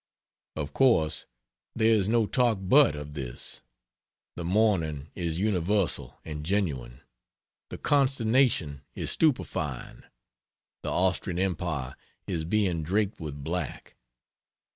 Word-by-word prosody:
Of 75 -2 -4
course 85 - +2 0.5
there 110 +1 +3
is 105 -2 +2
no 115 -1 +3
talk 120 0 +2
but 120 - +5
of 75 0 -7
this. 65 -4 -3 0.7
The 85 - -5
mourning 85 -7 +1
is 85 -3 -2
universal 100 -1 0
and 75 -2 -5
genuine, 75 -10 -2 0.7
the - - -6
consternation 125 - +2
is - - -1
stupefying. 80 - -1 0.8
The - - -3
Austrian 90 -1 +1
Empire 85 -8 -2 0.3
is 85 -4 -2
being 90 -3 +1
draped 100 +6 0
with 75 -3 -6
black. 90 +4 -4
90 Hz, 110 wpm, -28 LUFS, 75-110 Hz, 0.8 s, but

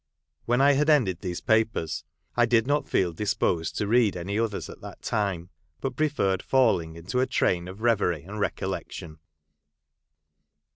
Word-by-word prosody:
When 120 +2 +2
I 140 +1 +6
had 145 +2 +2
ended 110 - +3
these 90 -3 -4
papers, 110 -9 +1 0.3
I 120 -1 +4
did 115 -1 +3
not 145 +2 0
feel 90 -3 +1
dis 105 +5 -1
posed 80 -2 0
to 105 - 0
read 110 -3 +3
any 100 +5 -2
others 115 -3 -2
at - - -11
that - - -10
time, 95 -4 -2 0.3
but 135 -2 -3
preferred 120 -11 +1
falling 110 -12 +2
into 85 +10 -3
a 130 - +2
train 90 -8 +1
of 95 +3 -9
reverie 100 -10 +2
and 105 +5 -7
recollection. 80 -5 -4
105 Hz, 160 wpm, -26 LUFS, 90-120 Hz, 0.3 s, I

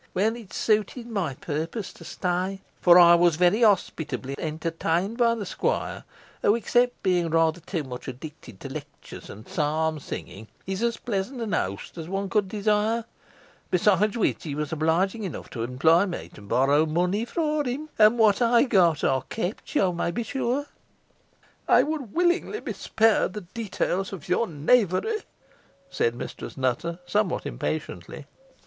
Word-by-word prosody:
Well, 215 +5 +2
it 225 -6 -11
suited 215 +3 0
my 195 - -2
purpose 165 - -4
to - - -14
stay; 185 +2 -2 0.2
for 175 -1 +7
I 170 -1 +9
was 170 -1 +4
very 180 +7 +3
hospitably 170 - +1
entertained 165 +5 -1
by 235 -2 +3
the 215 -3 -5
squire, - - -2 0.4
who, 205 - +4
except 245 +2 +1
being 180 -3 +2
rather 165 +1 +2
too 165 -1 -4
much 125 -2 -8
addicted 130 - -9
to - - -6
lectures - - -10
and 110 - -11
psalm 155 +1 0
singing, 110 -5 -8 0.2
is 190 +2 -3
as 235 0 0
pleasant 225 +1 -3
a - - +4
host 100 - -3
as 160 +1 -7
one 195 +1 -2
could 210 -3 +2
desire; 215 +2 +1 0.6
besides 205 +4 +3
which, 225 - +1
he 145 -4 -4
was 150 0 -3
obliging 170 +7 +1
enough 185 - -6
to 115 - -5
employ 160 - +3
me 175 - -6
to - - -14
borrow 140 +9 +2
money 180 +7 0
for 305 +3 -1
him, 275 +4 -3
and 215 +2 +6
what 220 0 +4
I 235 0 +5
got, 180 - +3
I 130 -1 +2
kept, 215 +7 -4
you 185 -9 +3
may 170 - -1
be 210 +8 -2
sure." 265 +3 -1 1.0
"I - - +6
would 295 -8 -4
willingly 355 +4 +1
be - - -5
spared 220 -4 +2
the 210 - -5
details 195 -1 -3
of 190 -6 -8
your 225 +6 +1
knavery," 195 - +2 0.7
said 115 0 0
Mistress - - -7
Nutter, 130 +6 -1
somewhat 210 +4 0
impatiently. - - -5
190 Hz, 160 wpm, -26 LUFS, 160-225 Hz, 1.0 s, I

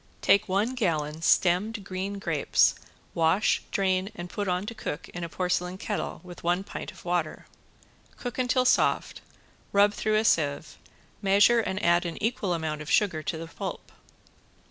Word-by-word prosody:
Take 200 0 +4
one 205 +6 +1
gallon 160 -9 -1
stemmed 195 +6 +2
green 195 +1 -4
grapes, 200 - +2 0.4
wash, 165 +5 +2
drain 190 0 0
and 175 0 -7
put 205 -1 -3
on 180 +1 0
to 230 - -5
cook 150 - -5
in 175 - -6
a 170 - -4
porcelain 180 +1 -1
kettle 210 +2 -4
with 180 -1 -11
one 175 +2 +1
pint 205 - -7
of 190 - -16
water. 175 -3 -2 0.7
Cook 245 0 -5
until 255 0 +2
soft, - - +2 0.5
rub 205 +1 +4
through 215 0 0
a 215 +1 +2
sieve, 150 -4 0 0.4
measure 205 +4 +5
and 190 -3 -2
add 175 +1 +3
an 170 - -6
equal 205 -5 -1
amount 155 -2 -3
of 150 - -7
sugar 185 -7 +2
to 160 - -3
the 165 - -6
pulp. 165 - -7
185 Hz, 165 wpm, -27 LUFS, 170-205 Hz, 0.7 s, measure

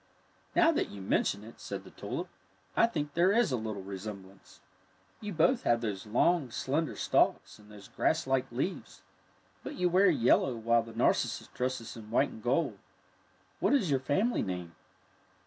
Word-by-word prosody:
'' - - -35
Now 335 -1 +6
that 320 - -1
you 100 - -9
mention 100 +1 0
it," 115 - -13
said - - -6
the - - -14
tulip, - - -5 0.5
I - - +5
think 150 -10 -3
there 175 +3 +4
is 230 -5 +3
a - - +2
little 110 -4 -4
resemblance. 95 0 -9 0.6
You 210 -1 -5
both 195 - +3
have 120 0 +2
those 105 -3 -4
long, 140 +6 +2
slender 145 +7 -1
stalks - - +1
and 105 0 -17
those 100 -2 -12
grasslike 130 -1 0
leaves. 135 +10 -4 0.6
But - - -7
you 180 -6 +1
wear 185 +2 +5
yellow 130 -3 +3
while 115 +1 +2
the 115 0 -11
narcissus - - +1
dresses 125 -2 -3
in 110 -2 -10
white 115 - +2
and 110 - -11
gold. 130 +8 0 0.8
What - - +3
is 195 - +1
your 135 - +3
family 195 - +1
name? 90 -3 -4
125 Hz, 170 wpm, -31 LUFS, 105-170 Hz, 0.8 s, Now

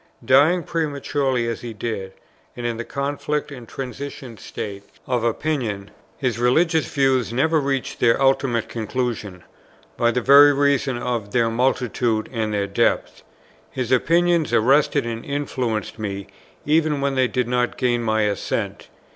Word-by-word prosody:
Dying 155 +7 +4
prematurely, 140 -6 -1
as 115 - -3
he 120 -2 -6
did, 100 -3 -4 0.4
and 120 - -5
in 120 -1 -1
the 120 - -4
conflict 145 +2 -3
and 125 -4 -9
transition 130 -1 -7
state 100 -1 -7 0.2
of 125 -4 -1
opinion, 115 -5 -2 0.3
his 125 -4 -1
religious 160 +4 +2
views 135 -4 +2
never 155 +6 +2
reached 135 -1 -2
their 115 -1 +3
ultimate 135 -4 +2
conclusion, 110 -5 -4 0.5
by 120 - +3
the 120 +1 +1
very 140 +3 +7
reason 140 -2 +1
of 120 -4 -3
their 115 -2 +2
multitude 120 -2 0
and 110 -2 -1
their 100 -1 0
depth. 100 - 0 0.5
His 130 -2 -4
opinions 170 +3 +3
arrested 130 +4 +3
and 115 0 -4
influenced 125 -7 -3
me, 100 -2 -4 0.4
even 155 -1 +2
when 140 0 0
they 130 -1 +2
did 125 -1 -1
not 125 0 0
gain 120 -1 +1
my 110 -1 +1
assent. 105 -1 -2
125 Hz, 145 wpm, -22 LUFS, 115-140 Hz, 0.5 s, very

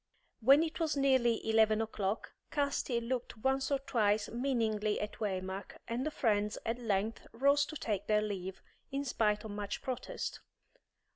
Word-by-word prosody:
When 275 +7 +7
it 325 +1 -4
was 315 -3 0
nearly 260 -5 +3
eleven 220 -1 +4
o'clock, 215 -2 -2 0.2
Casti 280 -4 0
looked 240 0 -3
once 265 +3 +1
or 280 - +3
twice 215 -6 +1
meaningly 225 -4 0
at 210 0 -5
Waymark, 190 -1 -3
and 235 +2 -1
the 310 - 0
friends 210 -7 +1
at 230 +2 -1
length 215 -1 -1
rose 280 +4 +4
to 310 - -7
take 210 -8 -2
their 210 0 +3
leave, 190 -3 -4 0.3
in 280 +1 -2
spite 210 -4 +1
of 220 - -6
much 205 0 -4
protest. 255 -1 -4
230 Hz, 155 wpm, -33 LUFS, 210-265 Hz, 0.3 s, When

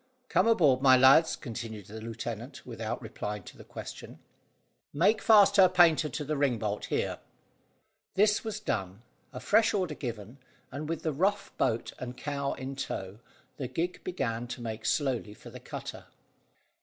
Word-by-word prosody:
"Come - - +3
aboard, 150 - +4
my 130 -1 +7
lads," 135 +6 +6
continued 110 -5 -7
the 110 +3 -9
lieutenant, 115 0 -6
without - - -4
replying 105 -2 -5
to - - -12
the - - -12
question. - - -9 0.8
"Make 195 +9 +3
fast 210 -2 +6
her 190 -2 +8
painter 170 -4 +4
to 145 +3 -4
the 155 +2 -1
ring 140 -4 +1
bolt 105 -1 -3
here." - - -2 1.0
This 210 +2 +3
was 215 -2 -4
done, 100 - -3 0.3
a - - -7
fresh 220 -1 +3
order 185 -6 -1
given, 120 -2 -7 0.3
and, 145 +4 -5
with 165 - -3
the 155 - 0
rough 190 +8 0
boat 115 -3 0
and 125 0 -6
cow 140 +1 -2
in 135 +1 -6
tow, 100 -6 -5 0.4
the 135 - -3
gig 175 +7 -3
began 120 -10 -3
to 125 0 -7
make 110 -2 -4
slowly 125 -7 0
for - - -13
the - - -9
cutter. - - -8
135 Hz, 165 wpm, -29 LUFS, 115-170 Hz, 1.0 s, her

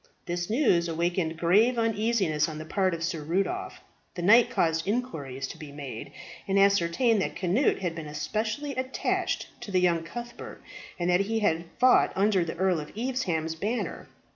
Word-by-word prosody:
This 175 +2 -3
news 215 - +3
awakened 170 0 -1
grave 210 +9 +3
uneasiness 215 -8 +1
on 155 - -6
the 155 - -7
part 185 +1 0
of 165 - -6
Sir 165 -2 -2
Rudolph. 195 - -2 0.3
The 175 - -4
knight 230 +6 +6
caused 165 -8 0
inquiries 145 - -3
to - - -9
be 150 -2 -9
made, 140 -6 -7 0.4
and 195 0 +1
ascertained 200 +3 +3
that - - -2
Cnut 190 +7 +1
had 175 -3 -1
been 165 -2 -7
especially 220 - -3
attached 260 0 -2
to 240 - -7
the 185 -2 +2
young 175 -2 +2
Cuthbert, 240 +9 -8 0.3
and 175 - -1
that 180 - +4
he 220 +3 0
had 170 -5 +1
fought 255 0 +5
under 195 -2 +3
the 165 0 -5
Earl 185 -2 +2
of 150 - -8
Evesham's 200 -11 -1
banner. 210 +9 -3
185 Hz, 170 wpm, -27 LUFS, 165-225 Hz, 0.4 s, knight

